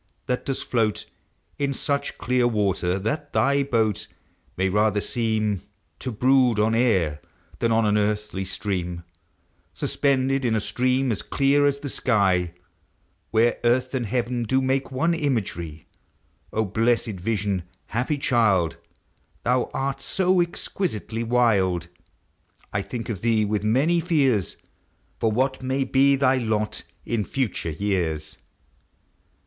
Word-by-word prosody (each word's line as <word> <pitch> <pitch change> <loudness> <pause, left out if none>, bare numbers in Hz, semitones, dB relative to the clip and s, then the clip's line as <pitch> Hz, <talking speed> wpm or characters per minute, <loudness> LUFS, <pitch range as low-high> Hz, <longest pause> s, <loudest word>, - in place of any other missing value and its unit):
that 125 0 -2
dost 135 - -3
rtoat 110 -4 +1 0.5
In 140 -1 0
such 140 +1 -2
clear 125 -1 +2
water, 95 -5 0
that 145 +9 -3
thy 140 +1 +3
boat 115 -6 0 0.5
May 95 +1 +2
rather 105 +2 +2
seem 110 -3 -1 0.4
To 130 - -4
brood 125 0 +3
on 110 +2 +2
air 95 -11 +2 0.4
than 115 - +1
on 115 0 +3
an 105 0 +3
earthly 105 -2 -1
stream 90 -3 -3 0.3
— - - -41
Suspended 135 -1 +1
in 115 -3 +1
a - - +2
stream 125 +5 +1
as 105 - -2
clear 145 +1 +2
as 140 0 0
sky, 95 -7 +1 0.7
Where 115 +1 +2
earth 125 +2 +2
and 125 -4 -1
heaven 120 +2 -1
do 125 +3 +1
make 135 +1 0
one 165 +7 +1
imagery; 100 - -2 0.6
0 110 0 0
blessed 110 0 0
vision! 100 -1 -1 0.2
happy 125 +6 -1
child! 110 - +2 0.7
Thou 125 +1 +1
art 135 0 -2
so 185 -1 +2
exquisitely 170 - -3
wild, 100 -8 +2 0.8
1 100 - 0
think 120 -2 -5
of 105 -6 -4
thee 110 -2 +2
with 105 0 -1
many 135 +11 +3
fears 140 - +1 0.6
For 110 - +2
what 130 +4 0
may 130 +1 0
be 135 +1 +4
thy 135 -1 +3
lot 110 -3 -1 0.2
in 115 -3 0
future 110 -9 -2
years. 80 -3 -2
115 Hz, 130 wpm, -24 LUFS, 105-130 Hz, 0.8 s, be